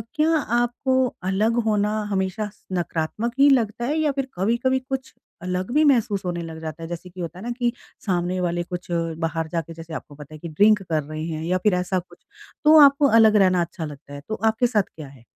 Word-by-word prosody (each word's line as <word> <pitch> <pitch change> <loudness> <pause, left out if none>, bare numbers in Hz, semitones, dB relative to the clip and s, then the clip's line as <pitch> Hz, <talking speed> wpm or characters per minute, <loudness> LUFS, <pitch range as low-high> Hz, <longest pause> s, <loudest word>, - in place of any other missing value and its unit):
क्या 310 +1 +3 0.3
आपको 240 +2 0 0.3
अलग 220 +4 +1
होना 210 0 +1 0.2
हमेशा 190 +2 -1
स - - -30
नकारात्मक 175 +5 -2
ही 285 +1 +7
लगता 235 -3 +1
है 295 +5 0
या 300 -2 +2
फ़िर 275 -1 -3
कभी-कभी 235 +7 +1
कुछ 265 -1 -4 0.3
अलग 180 +3 -3
भी 305 +2 +4
महसूस 225 -9 +2
होने 175 -1 -2
लग 160 -1 -8
जाता 160 +1 -6
है 165 - -5
जैसे 175 +1 -7
कि 180 +1 -9
होता 170 +1 -6
है 195 - -9
ना 240 - -2
कि 240 -1 +2 0.3
सामने 180 -1 0
वाले 175 -1 -1
कुछ 180 0 -7
बाहर 165 -1 -2
जाके 165 -1 -3
जैसे 165 0 -10
आपको 145 - -8
पता 150 +1 -12
है - - -11
कि 170 - -7
ड्रिंक 205 +6 +4
कर 160 -4 -1
रहे 155 +2 -6
हैं। 160 -1 -4
या 180 +2 +1
फ़िर 200 +2 +2
ऐसा 180 +1 -1
कुछ 180 - -17 0.4
तो 310 +1 +8
आपको 280 +1 +4
अलग 220 -1 +6
रहना 185 -3 +4
अच्छा 170 -1 -4
लगता 145 -1 -10
है। 145 - -7
तो 220 - -1
आपके 225 +2 +3
साथ 215 -4 +2
क्या 155 -3 -8
है? 135 -3 -16
185 Hz, 225 wpm, -23 LUFS, 165-230 Hz, 0.4 s, तो